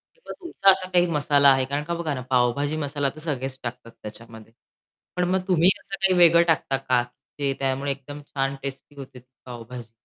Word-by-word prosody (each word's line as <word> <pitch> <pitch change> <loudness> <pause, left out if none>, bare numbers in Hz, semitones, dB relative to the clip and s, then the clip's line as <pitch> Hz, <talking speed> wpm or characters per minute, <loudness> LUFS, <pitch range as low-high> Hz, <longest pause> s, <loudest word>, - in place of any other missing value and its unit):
किंवा - - -11
तुमचा 340 - +3
असा 190 -1 0
काही 175 -1 +3
मसाला 145 -2 +3
आहे? 135 -1 +2
कारण 140 +3 -3
का 170 - -3
बघा 165 -3 -3
ना 130 - -5
पावभाजी 130 +4 +1
मसाला 145 -2 -2
तर 155 - -12
सगळेच 135 -4 -4
टाकतात 120 -1 -7
त्याच्यामध्ये. 110 +1 -11 0.6
पण 180 - +1
मग 190 0 +1
तुम्ही 175 -1 +4
असं 195 - -8
काही 190 -1 +2
वेगळं 170 -1 +6
टाकता 150 -4 +1
का, 130 -2 0 0.4
की 140 -1 0
त्यामुळे 135 +1 -1
एकदम 145 +2 -10
छान 135 0 -2
टेस्टी 140 +1 -8
होते 135 -2 -11
ती 125 - -20 0.2
पावभाजी? 120 -1 -10
140 Hz, 190 wpm, -24 LUFS, 130-165 Hz, 0.6 s, वेगळं